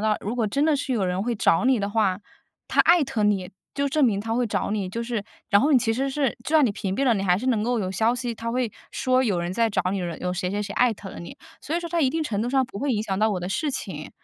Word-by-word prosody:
到 210 - +2
如 220 - -1
果 235 -3 0
真 275 +8 +1
的 315 -1 +3
是 275 -1 -3
有 210 -5 0
人 180 +1 -1
会 240 +2 -1
找 180 -2 +2
你 260 -2 +4
的 200 0 -2
话， 200 -4 +1 0.5
他 - - +3
艾 340 -2 +5
特 235 -4 -2
你， 195 -3 +1 0.2
就 280 0 0
证 305 +2 +1
明 205 -4 +1
他 225 +2 -3
会 245 0 +1
找 210 - -2
你 205 -3 -1
就 230 +5 -4
是 230 -3 -3 0.3
然 200 -2 +6
后 290 - +2
你 265 - +7
其 225 -1 0
实 265 +4 -1
是 270 -1 0
就 - - -4
算 310 -2 +6
你 225 - +1
屏 195 -1 -3
蔽 275 - +1
了， 250 - +4
你 200 -3 0
还 180 -2 +3
是 235 +7 -4
能 225 -5 +2
够 240 +2 0
有 185 -3 -2
消 220 +5 +2
息 245 -2 -3
它 230 +1 -4
会 245 -3 -1 0.2
说 255 0 +1
有 205 -8 +1
人 175 +1 -2
在 230 +4 +2
找 210 - 0
你， 195 - -1
有 180 0 -3
谁 180 0 -2
谁 205 +1 -2
谁 205 0 -5
艾 245 0 +3
特 195 -1 -9
了 - - -9
你， 170 - -9 0.2
所 315 - -3
以 - - -1
说 345 - -5
在 340 0 +1
一 275 - +4
定 320 +5 -1
程 215 -9 -2
度 235 - -1
上 265 +1 +2
不 250 -5 -9
会 285 +4 -1
影 215 -4 0
响 195 -3 -2
到 215 +1 +3
我 190 - -1
的 175 - -5
事 290 +9 -1
情， 165 - -5
225 Hz, 335 characters per minute, -24 LUFS, 195-255 Hz, 0.5 s, 你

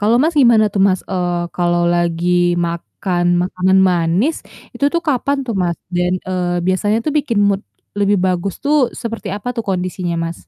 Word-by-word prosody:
Kalau 215 +3 +3
Mas 320 +2 +1
gimana 230 -3 +5
tuh 195 - +1
Mas, 185 -1 0
eee, 180 -2 -1 0.2
kalau 175 -1 +1
lagi 175 +1 +1
makan 175 +1 -3 0.2
makanan 185 +1 +1
manis, 175 - +1 0.4
itu 280 - -2
tuh 340 - +1
kapan 280 +1 +1
tuh, 230 - -2
Mas? 170 -1 -1 0.2
Dan, 180 0 +1 0.2
eee, 175 -1 -1
biasanya 205 +4 +1
tuh 305 - -1
bikin 240 -7 -1
mood 200 +1 0 0.4
lebih 205 0 +2
bagus 185 +1 -1
tuh 295 +1 +2 0.3
seperti 230 -3 -5
apa 210 +4 -6
tuh 230 - -3
kondisinya, 180 -1 -2
Mas? 165 0 -4
185 Hz, 170 wpm, -17 LUFS, 175-220 Hz, 0.4 s, gimana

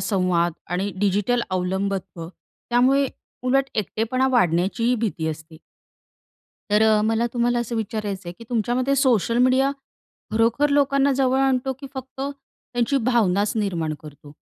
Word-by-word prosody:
संवाद, 180 -4 +1 0.2
आणि 190 +3 -1
डिजिटल 205 +4 +1
अवलंबित्व, 185 -1 -2
त्यामुळे 255 +8 0 0.4
उलट 265 +2 +2
एकटेपणा 225 +5 0
वाढण्याचीही 205 +3 +2
भीती 210 -9 -2
असते. 160 +1 -7 1.1
तर 210 +1 +4
अ, 220 -1 +4
मला 225 +1 +1
तुम्हाला 240 0 +1
असं 235 0 -3
विचारायचंय 205 -4 -4
की 230 - -11
तुमच्यामते 245 +4 +1
सोशल 240 -4 +2
मीडिया 255 +2 +4 0.6
खरोखर 230 +6 +2
लोकांना 275 -1 +3
जवळ 265 -1 +2
आणतो 265 -1 +1
की 275 - -7
फक्त 265 0 -8
त्याची 275 -2 -3
भावनाच 205 -4 +2
निर्माण 170 -7 -1
करतो? 145 0 -13
225 Hz, 125 wpm, -23 LUFS, 190-255 Hz, 1.1 s, तर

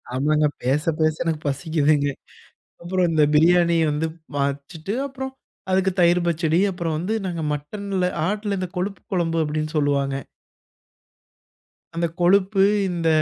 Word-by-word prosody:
ஆமாங்க. 150 +3 +2 0.2
பேச, 140 +5 +1 0.2
பேச 155 0 +2
எனக்கு 160 -2 -2
பசிக்குதுங்க. 145 0 +1 0.8
அப்புறம் 180 0 +1
இந்த 155 -2 +4
பிரியாணிய 170 +1 +4
வந்து 150 +2 -1 0.3
வச்சுட்டு 140 +6 -3
அப்புறம் 265 -1 -6 0.4
அதுக்கு 190 0 +2
தயிர் 175 +1 +5
பச்சடி, 165 0 +1
அப்புறம் 170 -3 -3
வந்து 185 +7 -2
நாங்க 175 -3 -3
மட்டன்ல 190 +5 -3 0.2
ஆட்டுல 205 0 -2
இந்த 185 -2 -3
கொழுப்பு 195 +2 -3
குழம்பு 165 -2 0
அப்படின்னு 155 0 -2
சொல்லுவாங்க. 140 -2 +1 1.8
அந்த 170 0 0
கொழுப்பு, 195 +2 +3 0.3
இந்த 170 -2 -1
165 Hz, 125 wpm, -23 LUFS, 150-185 Hz, 1.8 s, தயிர்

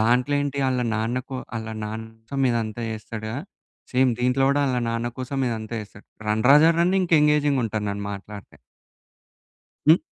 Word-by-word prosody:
దాంట్లో 125 +5 +3
ఏంటి 140 -1 -3
ఆళ్ళ 125 -1 0
నాన్న 115 +3 0
కొ 130 - -4 0.2
ఆళ్ళ 110 0 -5 0.2
నాన్న 110 +1 -5 0.2
సం 135 -1 -1
ఇదంతా 115 -1 -2
జేస్తాడుగా 110 +1 -5 0.6
సేమ్ 130 0 +4
దీంట్లో 125 +2 +2
కూడా 145 +1 +2
వాళ్ళ 130 -2 +1
నాన్న 115 +1 -1
కోసం 130 +2 -3
ఇదంతా 110 0 -4
జేస్తాడు. 105 0 -13 0.2
రన్ 110 +1 +1
రాజా 150 +3 +8
రన్ 175 +2 +3
ఇంక 175 - -3
ఎంగేజింగ్ 150 -2 +3
ఉంటాది 110 -1 -2
నేను 100 0 -4
మాట్లాడితే. 100 +1 -10 1.3
హ్మ్? 160 +3 +8
120 Hz, 160 wpm, -24 LUFS, 110-140 Hz, 1.3 s, రాజా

